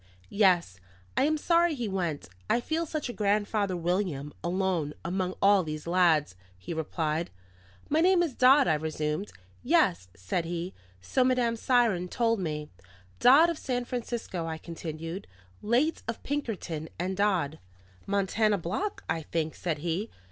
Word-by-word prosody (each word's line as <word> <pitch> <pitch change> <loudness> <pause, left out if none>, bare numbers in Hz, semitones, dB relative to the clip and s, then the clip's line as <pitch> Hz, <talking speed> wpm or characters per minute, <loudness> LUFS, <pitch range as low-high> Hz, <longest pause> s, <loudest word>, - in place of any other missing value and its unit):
"Yes, 180 - +3 0.4
I 265 - +3
am 310 +1 +2
sorry 335 +1 +3
he 240 -4 -3
went; 175 -7 -2 0.2
I 235 - +3
feel 320 +6 -2
such 305 -2 -3
a 240 - -5
Grandfather 205 -2 0
William, 170 -5 -1
alone 175 -4 -1
among 185 +1 -1
all 200 -1 +6
these 155 -2 -5
lads," 170 - +3 0.2
he 90 - -6
replied. 160 0 -2 0.6
"My 310 +2 +2
name 360 0 +5
is 320 -6 -2
Dodd," 265 +3 +6
I 160 - +4
resumed. 150 -7 -2 0.3
"Yes," 90 +1 +2
said 90 - -2
he, 175 +2 -4 0.3
"so 255 - +1
Madame 250 -2 +2
Siron 225 -7 +2
told 230 0 +1
me." 150 -4 -4 0.5
"Dodd, 290 +7 +7
of 330 - -6
San 245 -2 -2
Francisco," 235 -8 -4
I 160 0 -3
continued. 165 +2 -6 0.3
"Late 245 +9 +1
of 230 - -4
Pinkerton 205 - -3
and 185 +3 -2
Dodd." 185 -7 +1 0.5
"Montana 200 +2 +2
Block, 205 - -3
I 160 0 -1
think?" 160 0 -2
said 165 -4 -2
he. 175 +8 -2
185 Hz, 150 wpm, -28 LUFS, 160-240 Hz, 0.6 s, Dodd